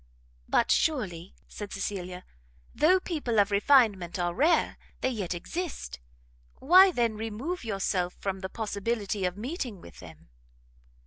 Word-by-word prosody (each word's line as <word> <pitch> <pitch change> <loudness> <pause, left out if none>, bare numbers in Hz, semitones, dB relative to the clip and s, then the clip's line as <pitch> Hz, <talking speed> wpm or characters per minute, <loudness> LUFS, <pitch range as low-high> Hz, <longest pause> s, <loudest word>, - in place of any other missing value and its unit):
"But - - +2
surely," 190 - 0
said 205 -1 -8
Cecilia, 185 -2 -5 0.5
"though 360 +5 +4
people 290 - -1
of 200 0 +3
refinement 200 -5 +3
are 175 -1 -1
rare, 305 - +2 0.2
they 260 - +1
yet 195 -7 -3
exist; 325 - -5 0.6
why, 370 +7 +7
then, 235 -7 0
remove 225 +11 -4
yourself 195 -4 -1
from 195 -1 -4
the 190 0 -5
possibility 205 -2 -2
of 180 +1 -2
meeting 245 - -5
with 85 - -14
them?" 80 -5 -14
210 Hz, 130 wpm, -28 LUFS, 185-260 Hz, 0.6 s, why